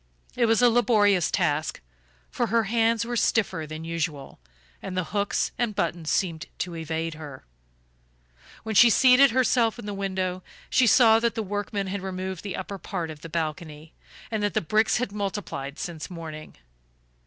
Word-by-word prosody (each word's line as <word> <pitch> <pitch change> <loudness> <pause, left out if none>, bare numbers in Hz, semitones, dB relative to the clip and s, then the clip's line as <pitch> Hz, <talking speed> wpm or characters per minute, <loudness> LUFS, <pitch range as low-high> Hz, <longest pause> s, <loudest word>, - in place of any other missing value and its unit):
It 240 -2 +2
was 225 +2 +3
a 245 - +7
laborious 205 -6 +3
task, 150 +1 0 0.5
for 240 - -1
her 230 0 +2
hands 225 +1 +1
were 240 +1 -3
stiffer 190 -8 0
than 155 +1 -7
usual, 165 -4 -4 0.4
and 185 - -6
the 185 - +1
hooks 205 -1 0
and 235 -4 -1
buttons 165 -2 -2
seemed 170 -4 -1
to 175 -2 -4
evade 165 0 -3
her. 150 -4 -10 1.2
When 220 0 -4
she 235 +4 +7
seated 260 +4 +6
herself 240 -2 +2
in 240 - -9
the 205 - -4
window, 185 -2 -2 0.3
she 255 - +4
saw 225 0 +6
that 235 0 0
the 225 - -2
workmen 205 0 -3
had 195 +1 -4
removed 190 -1 -5
the 200 -2 -5
upper 195 +1 -6
part 175 -5 -4
of 150 -1 -11
the 165 - -9
balcony, 155 -1 -5 0.4
and 220 -1 -1
that 205 0 -1
the - - +4
bricks 215 +7 +2
had 245 -5 -2
multiplied 195 -9 -4
since 160 -2 -6
morning. 160 -3 -8
195 Hz, 170 wpm, -25 LUFS, 165-225 Hz, 1.2 s, a